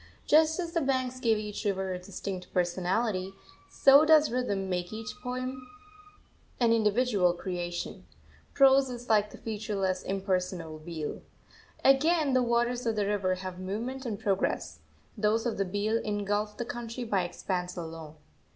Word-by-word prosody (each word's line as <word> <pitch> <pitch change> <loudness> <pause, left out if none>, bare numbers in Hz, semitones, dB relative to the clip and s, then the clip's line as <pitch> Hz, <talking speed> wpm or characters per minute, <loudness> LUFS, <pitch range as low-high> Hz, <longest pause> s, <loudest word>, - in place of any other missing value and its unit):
Just 315 +2 +4
as 340 -2 -3
the 335 -1 0
banks 255 -2 -1
give 230 -4 +2
each 210 0 -5
river 190 -2 -1
a 180 - -4
distinct 185 0 -6
personality, 185 +2 0 0.3
so 275 +2 +6
does 310 -3 +5
rhythm 205 -6 -1
make 180 -1 -2
each 215 0 -6
poem 255 0 -4 0.9
an 235 -2 +4
individual 210 -4 +3
creation; 175 - -5 0.5
prose 270 0 +6
is 245 0 -8
like 210 -1 +3
the - - -12
featureless, 205 -4 -2
impersonal 185 -4 -2
beel. 155 -1 -5 0.6
Again, 290 +2 +4
the 255 - +4
waters 240 0 +1
of 225 - +1
the 205 -1 +1
river 195 -2 0
have 185 -1 -7
movement 230 +8 -4
and 220 -6 -4
progress; 195 -1 -1 0.4
those 215 +1 +1
of 230 -4 -2
the 195 - +2
beel 205 +4 0
engulf 205 0 -2
the 240 - -3
country 240 +1 -5
by 205 -5 +1
expanse 180 +1 -3
alone. 160 -2 -7
210 Hz, 150 wpm, -29 LUFS, 185-250 Hz, 0.9 s, so